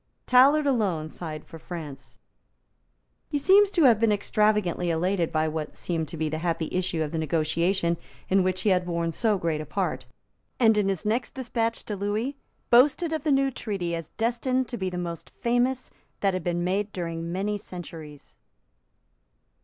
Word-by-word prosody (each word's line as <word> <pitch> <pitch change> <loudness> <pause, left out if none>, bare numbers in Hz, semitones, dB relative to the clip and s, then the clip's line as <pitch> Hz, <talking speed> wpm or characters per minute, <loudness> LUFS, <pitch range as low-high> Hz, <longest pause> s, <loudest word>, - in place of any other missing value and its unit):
Tallard 275 +4 +5
alone 195 - 0
signed 155 -3 -7
for 165 - -11
France. 155 -5 -8 1.1
He 290 - 0
seems 390 +7 +5
to 350 -5 +2
have 235 -6 +6
been 225 -1 +3
extravagantly 210 -4 +1
elated 175 +1 0
by 155 0 +1
what 155 -1 -4
seemed 165 -3 -2
to 165 - -7
be 160 0 -1
the 155 +1 -3
happy 165 -1 -1
issue 180 -3 0
of 150 - -4
the 165 - -2
negotiation 170 +3 +1 0.3
in 195 +1 +3
which 185 0 0
he 205 - +2
had 180 -1 +1
borne 170 -1 -1
so 215 +3 +1
great 165 -4 -1
a - - -6
part, 190 +5 -2 0.5
and 225 -3 +5
in 205 -2 +2
his 195 +1 -2
next 230 +4 -1
despatch 230 -3 -2
to 210 - -3
Lewis 210 +7 -2 0.4
boasted 290 +7 +5
of 315 - -1
the 310 - +1
new 270 0 +3
treaty 195 -8 -3
as 165 -1 -4
destined 245 +3 0
to 245 - -4
be 190 -3 -2
the 180 - -5
most 170 -2 -5
famous 245 +2 0 0.3
that 195 -1 +2
had 185 -2 -3
been 175 0 -1
made 195 +3 -1
during 170 -2 -4
many 200 +4 -1
centuries. 165 -6 -9
185 Hz, 175 wpm, -26 LUFS, 165-230 Hz, 1.1 s, have